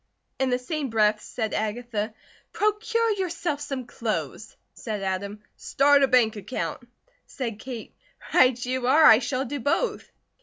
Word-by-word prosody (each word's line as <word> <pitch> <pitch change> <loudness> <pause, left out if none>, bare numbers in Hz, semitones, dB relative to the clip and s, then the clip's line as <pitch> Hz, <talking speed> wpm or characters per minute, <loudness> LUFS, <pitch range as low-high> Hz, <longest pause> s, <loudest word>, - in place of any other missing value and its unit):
In 265 -1 +1
the 250 - +2
same 280 +2 -4
breath 215 -1 +2
said 220 -3 -4
Agatha: 220 0 -3 0.4
"Procure 445 +2 +1
yourself 345 -6 -2
some 275 -3 -4
clothes!" 230 -2 -4 0.2
Said 210 -4 -5
Adam: 200 +2 -3
"Start 285 +1 +3
a 275 - +5
bank 245 -4 +3
account!" 215 +5 -4 0.5
Said 230 -5 -5
Kate: 240 -1 -8 0.4
"Right 250 -1 +4
you 255 0 -2
are! 310 +5 +5
I 220 - +9
shall 255 +1 -2
do 285 +3 -4
both." 415 - -1
250 Hz, 145 wpm, -25 LUFS, 220-285 Hz, 0.5 s, I